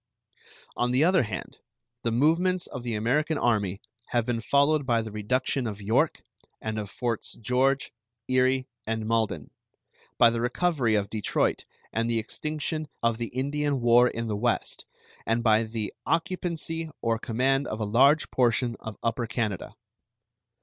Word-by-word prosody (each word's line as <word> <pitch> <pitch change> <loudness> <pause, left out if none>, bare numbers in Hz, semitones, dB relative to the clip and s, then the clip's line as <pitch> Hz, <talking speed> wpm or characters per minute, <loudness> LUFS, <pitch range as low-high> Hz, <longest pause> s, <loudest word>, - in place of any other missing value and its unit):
On 120 - +1
the 130 +4 +3
other 185 +1 +5
hand, 105 -6 -5 0.4
the 115 - 0
movements 170 +8 +2
of 125 - -7
the 120 -2 -3
American 145 +9 +1
Army 100 -7 0 0.2
have 120 -2 0
been 120 -2 -1
followed 140 +3 +3
by 120 -3 +1
the 110 - -7
reduction 125 +4 0
of 105 -2 -5
York, 105 +2 +1 0.4
and 110 0 -3
of 105 -2 -5
Forts 120 +1 -2
George, 130 +4 +1 0.4
Erie, 130 +1 +2 0.2
and 110 0 -2
Malden; 110 -10 -1 0.7
by 115 - +6
the 115 0 -2
recovery 125 -2 +1
of 100 -1 -1
Detroit 110 -2 0 0.3
and 115 +1 0
the 115 - +1
extinction 155 +6 -3 0.2
of 115 -1 +1
the 120 - -2
Indian 140 +2 -1
war 120 +1 +6
in 115 -1 -3
the 110 -2 -2
West, 120 +3 -1 0.4
and 115 +1 +1
by 110 -1 +5
the 110 -1 -4
occupancy 165 -1 -1
or 115 -1 +1
command 135 +4 +1
of 110 - -4
a 110 - -1
large 135 +9 +4
portion 120 -1 +2
of 110 -2 -7
Upper 115 0 -1
Canada. 105 -4 -3
120 Hz, 155 wpm, -27 LUFS, 110-140 Hz, 0.7 s, by